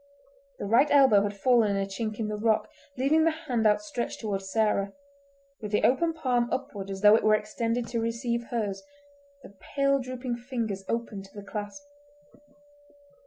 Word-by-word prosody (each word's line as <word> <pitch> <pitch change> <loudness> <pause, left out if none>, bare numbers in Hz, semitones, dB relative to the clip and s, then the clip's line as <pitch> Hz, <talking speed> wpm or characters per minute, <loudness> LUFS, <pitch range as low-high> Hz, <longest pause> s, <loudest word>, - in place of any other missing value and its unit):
The - - -5
right 235 +8 +4
elbow 265 -8 +6
had 205 0 -3
fallen 235 -1 +3
in - - 0
a 195 - 0
chink 215 +2 -4
in 220 - -2
the 210 - -3
rock, 215 0 +1 0.3
leaving 290 +5 +3
the 330 - +4
hand 255 -9 0
outstretched 245 +3 -1
toward 205 -3 -2
Sarah, 200 0 0 0.7
with 210 -2 -6
the 210 - +1
open 330 +7 +3
palm 250 -7 0
upward 200 -7 -4
as 195 0 -5
though 210 0 +7
it - - +1
were 215 0 +5
extended 230 +3 -2
to 230 -1 -1
receive 235 +1 -2
hers, 210 -5 -3 0.6
the - - -13 0.2
pale 275 0 +3
drooping 255 -1 -4
fingers 235 -6 -4
open 230 -4 -3
to 195 0 -15
the 205 - -8
clasp. 205 +7 -6
230 Hz, 170 wpm, -27 LUFS, 205-255 Hz, 0.7 s, though